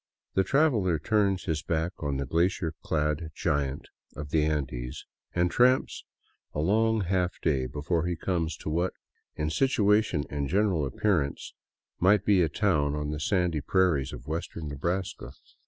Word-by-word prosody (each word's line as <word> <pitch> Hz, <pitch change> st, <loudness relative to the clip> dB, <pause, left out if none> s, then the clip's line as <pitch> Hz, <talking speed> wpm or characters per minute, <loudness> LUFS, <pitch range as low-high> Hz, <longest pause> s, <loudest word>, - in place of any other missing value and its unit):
The 95 Hz, -, +3 dB
traveler 115 Hz, -, +2 dB
turns 100 Hz, +3 st, +1 dB
his 80 Hz, -4 st, -1 dB
back 80 Hz, +2 st, -1 dB
on 70 Hz, -3 st, -2 dB
the 70 Hz, -, -2 dB
glacier 85 Hz, +2 st, 0 dB
clad 75 Hz, +1 st, -1 dB
giant 70 Hz, -1 st, -1 dB, 0.3 s
of 75 Hz, -1 st, -7 dB
the 80 Hz, -1 st, +3 dB
Andes 65 Hz, -5 st, -3 dB, 0.3 s
and 90 Hz, 0 st, +2 dB
tramps 125 Hz, +2 st, +2 dB, 0.5 s
a -, -, -1 dB
long 110 Hz, +6 st, +2 dB
half 90 Hz, -1 st, -1 dB
day 65 Hz, -5 st, 0 dB
before 75 Hz, +5 st, -1 dB
he 90 Hz, -, -1 dB
comes 85 Hz, -2 st, -2 dB
to -, -, -6 dB
what, 85 Hz, +3 st, 0 dB, 0.4 s
in 75 Hz, 0 st, -2 dB
situation 105 Hz, -, +2 dB
and 70 Hz, -1 st, -3 dB
general 95 Hz, -7 st, +2 dB
appearance, 75 Hz, -2 st, -1 dB, 0.5 s
might 100 Hz, +2 st, +4 dB
be 100 Hz, -3 st, +4 dB
a 80 Hz, -, +2 dB
town 75 Hz, -6 st, +1 dB
on 75 Hz, 0 st, -3 dB
the 75 Hz, -, -4 dB
sandy 90 Hz, -3 st, +1 dB
prairies 85 Hz, -4 st, +2 dB
of -, -, -9 dB
western 80 Hz, 0 st, -4 dB
Nebraska. 85 Hz, +7 st, -3 dB
85 Hz, 155 wpm, -28 LUFS, 75-95 Hz, 0.5 s, might